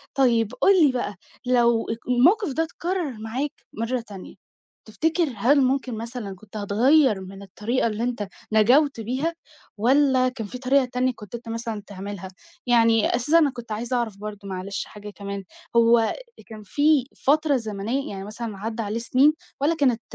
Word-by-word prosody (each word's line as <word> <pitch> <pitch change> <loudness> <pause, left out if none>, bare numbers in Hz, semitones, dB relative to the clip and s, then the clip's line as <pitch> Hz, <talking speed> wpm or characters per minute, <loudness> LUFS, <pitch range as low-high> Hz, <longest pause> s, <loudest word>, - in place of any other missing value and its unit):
طيّب 235 -5 +3
قُل 375 -5 +6
لي 275 - +4
بقى 245 -5 -3 0.3
لو 235 -2 +3 0.2
الموقف 310 - +4
ده 320 - +1
اتكرر 340 -1 -3
معاك 250 +7 -3 0.2
مرّة 230 +3 -2
تانية، 195 -3 -10 0.5
تفتكر 320 +6 0
هل 270 +8 +4
ممكن 260 -2 0
مثلًا 230 -3 -6
كنت 210 +3 -12
هتغيّر 220 +2 +3
من 195 +1 -10
الطريقة 215 +6 -1
اللي 220 +1 -3
أنت 240 -4 -2 0.2
نجوْت 245 +6 +4
بيها، 260 +9 -2 0.4
والّا 260 +2 +3
كان 240 -4 -6
في 250 - -7
طريقة 260 +1 +2
تانية 250 +1 0
كنت 210 +1 -9
أنت 235 0 -9
مثلًا 225 -2 -4
تعملها؟ 195 -1 -7 0.4
يعني 230 -2 +4
أساسًا 275 +7 +3
أنا 300 -4 +3
كنت 240 -3 -10
عايزة 235 +4 -2
أعرف 225 -4 -2
برضه 205 -1 -8
معلش 195 +1 -4
حاجة 210 0 -10
كمان 200 -1 -6 0.3
هو 230 -1 +4 0.3
كان 215 -1 -10
في 290 +5 +2 0.2
فترة 300 +1 +3
زمنيّة 225 +4 -3
يعني 195 -1 -6
مثلًا 215 0 -6
عدّى 225 +3 -4
عليه 210 +2 -3
سنين، 260 +6 +4 0.3
والّا 310 +4 +2
كانت 255 -7 +2
235 Hz, 160 wpm, -24 LUFS, 210-270 Hz, 0.5 s, قُل